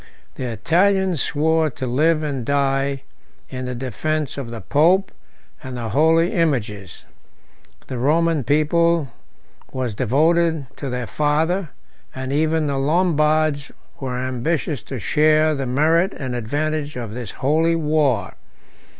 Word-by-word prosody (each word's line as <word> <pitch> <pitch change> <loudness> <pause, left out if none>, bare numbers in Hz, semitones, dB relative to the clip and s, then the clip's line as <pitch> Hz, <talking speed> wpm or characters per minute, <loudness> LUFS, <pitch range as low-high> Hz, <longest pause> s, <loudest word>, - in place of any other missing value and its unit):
The 130 - -5
Italians 175 - +1
swore 160 +1 +1
to 130 - -6
live 155 +6 +2
and 140 -5 -3
die 135 0 0 0.5
in 130 0 -5
the 125 0 -4
defence 140 +4 -2
of 135 -4 -6
the 115 -1 -6
pope 170 - +3 0.5
and 130 -4 -7
the 115 -2 -4
holy 160 - +3
images; 105 - -2 0.8
the 130 - -5
Roman 160 +2 +2
people 155 +3 +2 0.6
was 130 -4 -3
devoted 160 +6 +2
to 140 - -5
their 125 -1 -3
father, 160 +6 0 0.5
and 130 +1 -4
even 160 +1 +1
the 140 -2 -1
Lombards 155 -2 +1 0.3
were 130 -2 -4
ambitious 130 +2 -2
to 130 +6 -7
share 155 +6 +3
the 135 -3 -3
merit 160 +8 +2
and 130 -2 -4
advantage 145 +5 -2
of 115 -4 -5
this 120 -4 -6
holy 160 +5 +1
war. 150 - +1
145 Hz, 130 wpm, -21 LUFS, 130-160 Hz, 0.8 s, pope